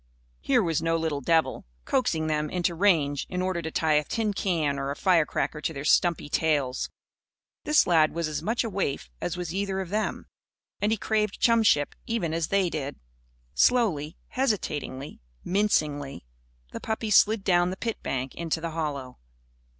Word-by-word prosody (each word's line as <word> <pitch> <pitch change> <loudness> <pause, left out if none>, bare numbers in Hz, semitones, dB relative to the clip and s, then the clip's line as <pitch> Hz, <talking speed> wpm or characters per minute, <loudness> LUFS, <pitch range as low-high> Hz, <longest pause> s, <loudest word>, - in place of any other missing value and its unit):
Here 250 -5 +2
was 165 -4 0
no 165 0 +1
little 160 -3 -2
devil, 160 - +1 0.2
coaxing 210 -12 +1
them 150 -1 -1
into 175 -1 0
range 160 -6 +2
in 180 - -3
order 185 -1 -1
to 160 - -4
tie 160 0 +1
a - - -4
tin 215 +6 -1
can 160 -8 0
or 135 0 -2
a 140 - -2
firecracker 165 -4 +1
to 160 - -2
their 140 0 -6
stumpy 170 0 +3
tails. 145 -4 0 0.8
This 300 0 +4
lad 160 -3 +4
was 170 -1 -2
as 155 -1 -3
much 230 +4 0
a 230 - -3
waif 140 - -2
as 175 - -3
was 175 -2 -4
either 195 0 -1
of 190 -3 -4
them. 215 +2 -2 0.6
And 210 +1 +2
he 220 - +2
craved 210 -1 -1
chumship, 220 -11 +3
even 215 -9 -1
as 165 -1 0
did 195 -3 +1
they. 145 -2 -3 0.6
Slowly, 170 - +2
hesitatingly, 150 - -2 0.2
mincingly, 150 - 0 0.5
the - - -6
puppies 220 -1 -1
slid 215 -1 +5
down 175 -2 +3
the 185 - -5
pit 230 0 -3
bank 130 0 -3
into 165 -1 -2
the 165 0 -4
hollow. 145 -5 -4
170 Hz, 170 wpm, -27 LUFS, 150-200 Hz, 0.8 s, slid